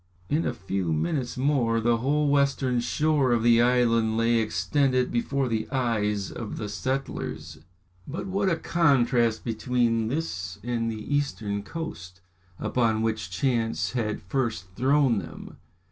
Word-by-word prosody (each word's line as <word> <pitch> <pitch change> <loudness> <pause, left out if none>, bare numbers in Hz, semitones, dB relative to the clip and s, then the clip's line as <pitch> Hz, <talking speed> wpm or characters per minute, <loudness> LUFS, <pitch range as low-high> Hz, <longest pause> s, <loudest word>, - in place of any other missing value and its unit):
In 155 +3 +1
a - - -1
few 95 -2 -2
minutes 105 - -1
more, 125 -4 +2
the 115 +1 +2
whole 145 +5 +1
western 140 -3 +2
shore 145 +1 +1
of 120 -2 +2
the 115 0 +5
island 115 -2 +3
lay 115 +1 +3
extended 125 +5 +1
before 135 +3 0
the 110 -2 -2
eyes 105 -6 0
of 115 -3 -6
the 105 - -4
settlers. 130 +6 -4 0.5
But 160 +6 -5
what 195 0 0
a 170 - +2
contrast 125 -9 +2
between 115 -1 0
this 100 - -3
and 115 -1 -1
the 110 +6 -3
eastern 110 -8 -1
coast, 95 - -7 0.4
upon 110 -3 +1
which 110 -3 -2
chance 115 +3 0
had 110 -8 -2
first 105 -4 -2
thrown 135 -2 +3
them. 80 - -10
120 Hz, 140 wpm, -26 LUFS, 110-135 Hz, 0.5 s, the